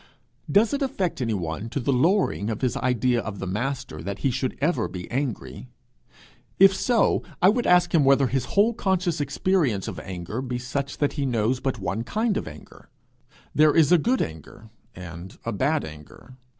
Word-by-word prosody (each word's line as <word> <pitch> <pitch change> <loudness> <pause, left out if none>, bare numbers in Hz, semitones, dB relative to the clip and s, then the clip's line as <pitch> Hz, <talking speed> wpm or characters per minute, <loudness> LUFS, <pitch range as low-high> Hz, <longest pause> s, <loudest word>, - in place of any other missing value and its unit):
Does 210 - +4
it 285 - -1
affect 195 - -1
anyone 100 -3 -3
to 140 - -3
the 135 +2 0
lowering 160 - +2
of 110 - -4
his 130 -2 0
idea 125 -1 +1
of 110 -2 -6
the 95 - -5
Master 125 +7 -3
that 100 0 -5
he 135 - +3
should 130 +1 -2
ever 145 -6 +1
be 90 -1 -7
angry? 120 - -4 0.9
If 195 0 +7
so, 235 +2 +2 0.2
I 185 - +6
would 235 +3 +1
ask 180 -1 +4
him 160 -4 +5
whether 135 0 +4
his 130 0 -1
whole 220 +4 +5
conscious 185 -7 0
experience 140 - 0
of - - -5
anger 95 +5 -5
be 125 -2 -3
such, 135 +3 -4
that 145 - 0
he 140 -2 -2
knows 120 +1 0
but 135 -2 -2
one 100 +2 -3
kind 215 - -1
of - - -3
anger. 75 -1 -13 0.6
There 155 0 +4
is 160 -2 +5
a 175 - +6
good 250 - +1
anger 80 +8 -10 0.2
and 85 +1 -9
a 115 - -1
bad 140 +9 0
anger. 80 - -12
130 Hz, 185 wpm, -25 LUFS, 105-170 Hz, 0.9 s, If